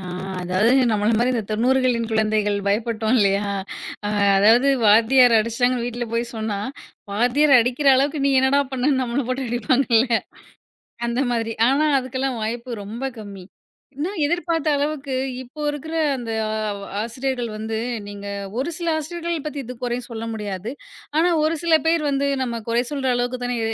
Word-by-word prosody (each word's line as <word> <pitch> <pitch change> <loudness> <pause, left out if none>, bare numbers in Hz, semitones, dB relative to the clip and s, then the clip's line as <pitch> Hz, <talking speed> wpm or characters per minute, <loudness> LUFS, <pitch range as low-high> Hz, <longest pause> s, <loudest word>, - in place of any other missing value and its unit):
ஆ, - - -9 0.4
அதாவது, 185 +6 +2 0.2
நம்மள 210 0 +1
மாரி 245 +2 +2
இந்தத் 225 -4 -3
90களின் 245 +1 +2
குழந்தைகள் 215 -2 +1
பயப்பட்டோம் 220 +3 0
இல்லையா? 200 0 +2 0.6
அ - - -1 0.3
அதாவது 230 +7 +5 0.2
வாத்தியார் 230 +3 +6
அடிச்சுட்டாங்கன்னு 235 +2 0
வீட்டுல 240 0 -4
போய்ச் 235 0 -2
சொன்னா, 215 -2 -2 0.5
வாத்தியார் 250 +6 +3
அடிக்கிற 250 +4 +1
அளவுக்கு 280 +1 0
நீ 280 - +3
என்னடா 270 +2 +3
பண்ணன்னு, 265 +1 +1
நம்மள 245 +1 -2
போட்டு 260 0 -2
அடிப்பாங்கள்ல! 240 0 +2 1.0
அந்த 235 +2 -1
மாதிரி. 225 -1 -1 0.2
ஆனா, 285 +3 +2 0.2
அதுக்கெல்லாம் 260 0 -3
வாய்ப்பு 235 +3 -4
ரொம்ப 230 +6 -6 0.2
கம்மி. 200 -3 -9 0.5
ஏன்னா, 330 +6 -1
எதிர்பார்த்த 330 -1 0
அளவுக்கு 285 -1 -2 0.3
இப்போ 265 +5 -12
இருக்குற 295 +2 -6 0.2
அந்த 235 -2 -5 0.2
அ - - -3 0.5
ஆசிரியர்கள் 245 +1 -3
வந்து 220 +1 -4 0.3
நீங்க 205 0 -8 0.3
ஒரு 280 +6 -1
சில 340 0 -3
ஆசிரியர்களைப் 335 0 -4
பத்தி 290 -1 -4
இது 250 +1 -8
குறை 240 0 -1
சொல்ல 225 -1 -6
முடியாது. 210 -1 -5 0.5
ஆனா, 350 +2 +4
ஒரு 315 +2 +1
சில 335 -1 +3
பேர் 330 -1 +3
வந்து, 280 0 0 0.2
நம்ம 235 -2 -3
குறை 235 +1 +2
சொல்ற 275 -3 -2
அளவுக்குத் 245 +1 -2
தான் 245 0 -1
இ - - -2
245 Hz, 155 wpm, -22 LUFS, 225-275 Hz, 1.0 s, வாத்தியார்